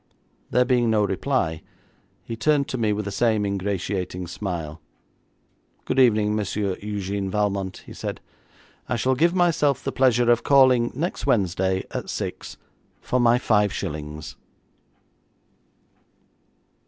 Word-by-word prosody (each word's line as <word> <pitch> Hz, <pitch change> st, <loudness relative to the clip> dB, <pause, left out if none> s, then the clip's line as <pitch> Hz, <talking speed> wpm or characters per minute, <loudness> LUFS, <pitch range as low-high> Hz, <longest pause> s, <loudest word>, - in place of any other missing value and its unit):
There 125 Hz, 0 st, +3 dB
being 125 Hz, -2 st, +2 dB
no 110 Hz, -1 st, +3 dB
reply, 95 Hz, -, -1 dB, 0.6 s
he 115 Hz, -, -6 dB
turned 145 Hz, +3 st, +2 dB
to 130 Hz, -, -3 dB
me 110 Hz, -2 st, +1 dB
with 105 Hz, 0 st, -2 dB
the 100 Hz, -, -4 dB
same 110 Hz, 0 st, +1 dB
ingratiating 95 Hz, -2 st, -3 dB
smile, 85 Hz, -4 st, -5 dB, 1.0 s
'Good -, -, 0 dB
evening, 105 Hz, -4 st, +4 dB
Monsieur 100 Hz, -1 st, -1 dB
Eugène 100 Hz, -1 st, -3 dB
Valmont,' 100 Hz, -2 st, -2 dB
he -, -, -10 dB
said, -, -, -5 dB, 0.7 s
'I -, -, +1 dB
shall 130 Hz, +3 st, +1 dB
give 170 Hz, +7 st, +2 dB
myself 160 Hz, -6 st, +2 dB
the 135 Hz, -, -2 dB
pleasure 120 Hz, -3 st, +3 dB
of 120 Hz, -, +3 dB
calling 130 Hz, -4 st, +4 dB
next 160 Hz, +1 st, -3 dB
Wednesday 95 Hz, -5 st, +1 dB
at -, -, -5 dB
six -, -, -5 dB, 0.4 s
for 125 Hz, -, -1 dB
my 120 Hz, 0 st, +4 dB
five 105 Hz, -5 st, +2 dB
shillings.' 75 Hz, -5 st, -6 dB
105 Hz, 130 wpm, -24 LUFS, 95-125 Hz, 1.0 s, evening